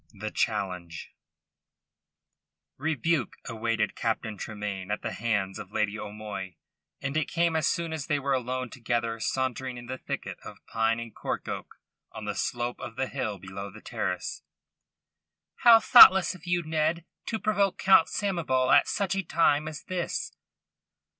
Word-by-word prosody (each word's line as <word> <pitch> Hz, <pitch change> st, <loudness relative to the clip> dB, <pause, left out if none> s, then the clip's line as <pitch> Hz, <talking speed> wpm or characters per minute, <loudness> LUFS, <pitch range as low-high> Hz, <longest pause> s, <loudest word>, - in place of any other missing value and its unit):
THE 110 Hz, +2 st, -5 dB
CHALLENGE 90 Hz, -6 st, -2 dB, 1.7 s
Rebuke 160 Hz, -1 st, 0 dB
awaited 115 Hz, -2 st, -1 dB
Captain 110 Hz, -1 st, -2 dB
Tremayne 105 Hz, -3 st, -5 dB
at 105 Hz, -, -2 dB
the -, -, -2 dB
hands 105 Hz, -4 st, -1 dB
of 95 Hz, -, -9 dB
Lady 105 Hz, 0 st, -1 dB
O'Moy, 105 Hz, -3 st, -6 dB, 0.4 s
and 135 Hz, +2 st, -4 dB
it 155 Hz, -, 0 dB
came 170 Hz, -1 st, +1 dB
as 160 Hz, -, +2 dB
soon 165 Hz, -1 st, -1 dB
as 155 Hz, -3 st, -4 dB
they 150 Hz, -3 st, +2 dB
were 140 Hz, 0 st, -1 dB
alone 130 Hz, -1 st, -2 dB
together 115 Hz, -1 st, -2 dB
sauntering 130 Hz, +1 st, -2 dB
in 120 Hz, -, -9 dB
the 130 Hz, +1 st, -6 dB
thicket -, -, -5 dB
of -, -, -11 dB
pine 115 Hz, 0 st, 0 dB
and 115 Hz, -2 st, -7 dB
cork -, -, -4 dB
oak -, -, -6 dB, 0.4 s
on 110 Hz, -, -8 dB
the 105 Hz, -, -2 dB
slope 120 Hz, +4 st, -2 dB
of 115 Hz, -, -7 dB
the 130 Hz, -, 0 dB
hill 110 Hz, -7 st, -3 dB
below 95 Hz, +2 st, -7 dB
the 105 Hz, +2 st, -12 dB
terrace. -, -, -3 dB, 1.2 s
"How 235 Hz, -2 st, +8 dB
thoughtless 190 Hz, -6 st, +9 dB
of 180 Hz, -1 st, -14 dB
you, 175 Hz, 0 st, +1 dB
Ned, 160 Hz, +1 st, 0 dB, 0.2 s
to 225 Hz, -, -1 dB
provoke 205 Hz, -3 st, +1 dB
Count 190 Hz, -4 st, +6 dB
Samoval 165 Hz, -11 st, 0 dB
at -, -, +5 dB
such 195 Hz, -2 st, 0 dB
a 195 Hz, -, 0 dB
time 155 Hz, -3 st, +2 dB
as 155 Hz, -1 st, -7 dB
this!" 180 Hz, -2 st, -3 dB
125 Hz, 155 wpm, -28 LUFS, 110-160 Hz, 1.7 s, thoughtless